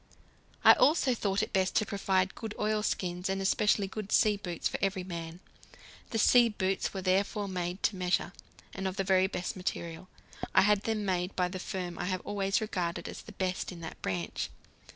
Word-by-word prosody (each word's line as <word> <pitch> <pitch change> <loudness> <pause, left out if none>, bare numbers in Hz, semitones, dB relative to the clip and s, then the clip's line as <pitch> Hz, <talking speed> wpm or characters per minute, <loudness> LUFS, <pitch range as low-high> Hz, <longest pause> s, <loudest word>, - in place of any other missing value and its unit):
I - - +10
also 270 -1 +4
thought 200 -2 0
it - - -5
best 190 -1 +1
to 215 - +3
provide 195 -2 0
good 225 -2 -6
oilskins, 195 -4 -1
and 195 0 0
especially 205 +1 +2
good 200 +1 -6
sea 215 -1 +4
boots 180 -5 -3
for - - -4
every 195 -1 0
man. 170 -1 -6 0.7
The 225 - -2
sea 235 +2 +6
boots 195 -3 -1
were 190 -2 -5
therefore 200 +2 +1
made 180 0 -3
to 205 - +2
measure, 180 -1 0 0.4
and 190 -1 -3
of 190 - -3
the 195 - 0
very 190 0 +3
best 180 -2 -4
material. 175 -1 -4 0.5
I - - +8
had 210 0 +3
them 220 -2 -1
made 180 0 -1
by 180 -1 +1
the 185 0 -5
firm 180 -2 -5
I - - -2
have 185 0 -1
always 195 0 0
regarded 180 -5 -2
as - - -7
the - - -12
best 185 -1 -2
in 175 -2 -9
that 165 - -8
branch. 90 -2 -3
190 Hz, 195 wpm, -30 LUFS, 180-205 Hz, 0.7 s, I